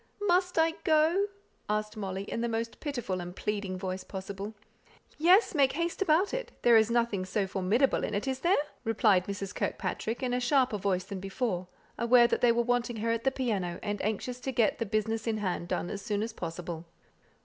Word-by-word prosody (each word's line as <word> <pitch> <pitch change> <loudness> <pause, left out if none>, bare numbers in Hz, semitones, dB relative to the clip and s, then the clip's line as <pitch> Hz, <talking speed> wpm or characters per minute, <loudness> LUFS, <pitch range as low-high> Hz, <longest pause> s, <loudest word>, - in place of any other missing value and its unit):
"Must 360 0 +2
I 325 0 +4
go?" 320 +5 +3 0.4
asked 215 +1 -1
Molly, 195 -2 -4
in 230 - -4
the 235 - 0
most 230 0 -3
pitiful 245 - -3
and 175 +1 -7
pleading 200 -3 -2
voice 185 0 -4
possible. 195 +3 -6 0.6
"Yes; 365 +8 +5
make 275 -4 +3
haste 335 +5 -2
about 365 +2 +3
it; - - -3
there 240 -1 +6
is 220 0 +5
nothing 235 -5 +1
so 195 +2 -1
formidable 195 +8 +1
in - - -2
it, 210 +6 -2
is 265 -1 -1
there?" 350 +7 +3 0.3
replied 215 -5 +3
Mrs. 200 0 -4
Kirkpatrick, 225 +4 -3
in 250 -1 0
a 250 - +1
sharper 250 -3 +2
voice 185 -2 0
than 195 0 -6
before, 195 -1 -2 0.3
aware 235 +1 +6
that 235 - +1
they 245 - +6
were 235 +1 +2
wanting 245 0 0
her 230 +2 0
at 230 +1 -2
the - - +6
piano, 205 -10 -2
and 205 -1 -2
anxious 220 +4 -2
to 265 - -3
get 230 -4 +2
the 230 - -1
business 220 +2 -1
in 220 -1 +1
hand 185 -4 -2
done 175 - -2
as 200 - -5
soon 210 0 -1
as 225 0 -4
possible. 170 -2 -6
225 Hz, 200 wpm, -30 LUFS, 195-255 Hz, 0.6 s, there